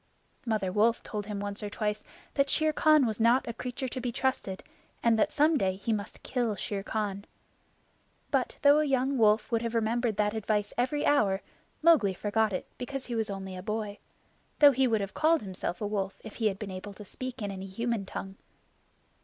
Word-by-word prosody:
Mother 215 -5 0
Wolf 225 +4 +2
told 210 -2 -5
him 210 -2 -4
once 205 +1 -4
or 210 - -4
twice 210 0 -2 0.3
that 275 0 +2
Shere 310 0 +2
Khan 305 -3 +5
was 220 -2 -2
not 235 +3 +4
a 235 - -3
creature 250 +3 -4
to 255 - -5
be 245 0 -2
trusted, 255 -7 -2 0.4
and 235 -1 +5
that - - +3
some 300 0 +3
day 190 -1 +1
he 200 +4 -2
must 205 -2 -5
kill 240 -4 -1
Shere 200 0 -3
Khan. 200 -1 -3 1.1
But - - 0
though 285 +1 +7
a - - +3
young 270 -1 +1
wolf 215 +1 +3
would 230 -1 +2
have 230 0 -3
remembered 230 0 +1
that 210 0 +1
advice 210 -1 -1
every 260 +5 0
hour, 200 -9 +3 0.4
Mowgli 285 - +5
forgot 215 +2 +1
it 185 - -3
because 265 +1 -4
he 245 - -5
was 220 -2 -1
only 190 -1 -5
a 185 - -6
boy 210 +1 -3 0.6
though 290 -1 +8
he 265 0 +2
would 220 -3 +1
have 195 -1 -4
called 315 -2 +3
himself 185 -2 -4
a - - -1
wolf 200 -2 -2
if 220 - -9
he 225 - +2
had 195 -2 -1
been 200 -1 -6
able 190 +2 -7
to 210 +1 -11
speak 255 +5 -6
in 205 -2 -3
any 190 0 -6
human 230 +2 -2
tongue. 195 +1 -6
220 Hz, 205 wpm, -29 LUFS, 200-250 Hz, 1.1 s, though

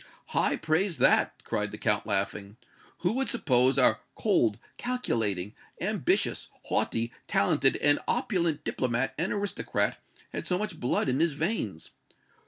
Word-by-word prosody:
"High - - +1
praise, 160 +2 0
that!" - - +3
cried - - -2
the - - -8
Count, - - 0
laughing. 100 +1 -2 0.4
"Who 180 - +2
would 265 +4 0
suppose 130 - +3
our 130 - +4 0.2
cold, 105 -3 +2 0.2
calculating, 110 - -2 0.3
ambitious, - - 0 0.2
haughty, 115 +1 -1
talented 135 +6 +3
and 145 0 +5
opulent 170 - 0
diplomat 125 -1 -1
and 170 - 0
aristocrat 205 -1 -1 0.3
had - - -4
so 180 - +1
much 190 -5 -4
blood 125 - 0
in 130 +1 +1
his 165 -1 +2
veins? 140 - -3
140 Hz, 135 wpm, -28 LUFS, 115-180 Hz, 0.4 s, and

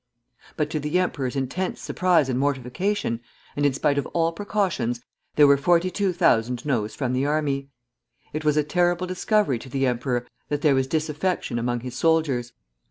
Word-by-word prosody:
But 150 -1 -1
to 155 - -1
the 150 +4 0
emperor's 145 -8 -1
intense 140 +8 -2
surprise 175 -6 +2
and 130 -1 -1
mortification, 140 - -1 0.4
and 145 0 +2
in 140 - 0
spite 140 +1 +1
of - - -3
all 165 -1 +2
precautions, 170 - -1 0.4
there 150 - +7
were 140 0 +6
42,000 170 - +2
Noes 115 -7 -1
from 130 -3 -1
the 130 +2 +1
army. 140 -2 -1 0.6
It 155 +1 -3
was 150 -1 +2
a 150 - +4
terrible 175 +3 +1
discovery 185 - +1
to 130 - -11
the 135 +1 0
emperor 125 0 -1 0.2
that 145 0 -2
there 150 - +5
was 130 -1 +1
disaffection 155 -3 -1
among 120 0 -1
his 125 0 -6
soldiers. 145 -6 +1
145 Hz, 165 wpm, -24 LUFS, 130-170 Hz, 0.6 s, there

